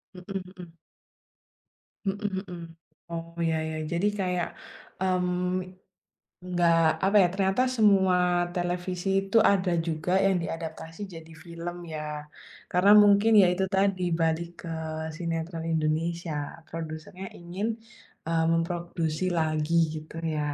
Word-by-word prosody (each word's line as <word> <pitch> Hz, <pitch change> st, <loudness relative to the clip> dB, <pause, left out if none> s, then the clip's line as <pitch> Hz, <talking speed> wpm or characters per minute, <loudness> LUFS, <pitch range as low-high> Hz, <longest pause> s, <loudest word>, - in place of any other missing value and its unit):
Mhm 190 Hz, +1 st, -5 dB
mhm. 180 Hz, -3 st, -12 dB, 1.3 s
Mhm 200 Hz, +2 st, -1 dB, 0.2 s
mhm, 175 Hz, -2 st, -8 dB, 0.5 s
Oh, 165 Hz, 0 st, -6 dB, 0.2 s
ya 160 Hz, -, +1 dB
ya, 155 Hz, -, -4 dB
jadi 170 Hz, +4 st, +1 dB
kayak, 180 Hz, -2 st, 0 dB, 0.5 s
mmm, 180 Hz, 0 st, 0 dB, 0.9 s
nggak, 175 Hz, -2 st, +3 dB, 0.3 s
apa 195 Hz, +2 st, +2 dB
ya, -, -, +4 dB
ternyata 195 Hz, +4 st, +1 dB
semua 195 Hz, -6 st, +4 dB, 0.4 s
televisi 180 Hz, +1 st, -2 dB
itu 195 Hz, +3 st, +1 dB
ada 185 Hz, -2 st, +1 dB, 0.2 s
juga 160 Hz, +2 st, -2 dB
yang 195 Hz, -1 st, +3 dB
diadaptasi 165 Hz, +1 st, -6 dB
jadi 165 Hz, 0 st, -11 dB
film 170 Hz, 0 st, -6 dB, 0.2 s
ya. 155 Hz, -, -3 dB, 0.7 s
Karena 180 Hz, +3 st, +5 dB
mungkin 205 Hz, +2 st, +5 dB
ya 185 Hz, -, +6 dB
itu 185 Hz, +2 st, -1 dB
tadi 195 Hz, -1 st, +2 dB, 0.2 s
balik 165 Hz, +1 st, +1 dB, 0.2 s
ke 170 Hz, -, -6 dB, 0.5 s
sinetron 165 Hz, 0 st, -3 dB
Indonesia 160 Hz, +2 st, -1 dB, 0.4 s
produsernya 165 Hz, +3 st, -7 dB
ingin, 175 Hz, +5 st, -3 dB, 0.6 s
eee, 165 Hz, 0 st, +2 dB
memproduksi 165 Hz, -1 st, -1 dB
lagi 155 Hz, 0 st, 0 dB, 0.2 s
gitu 155 Hz, +1 st, -9 dB, 0.2 s
ya. -, -, -1 dB
175 Hz, 115 wpm, -27 LUFS, 165-190 Hz, 1.3 s, ya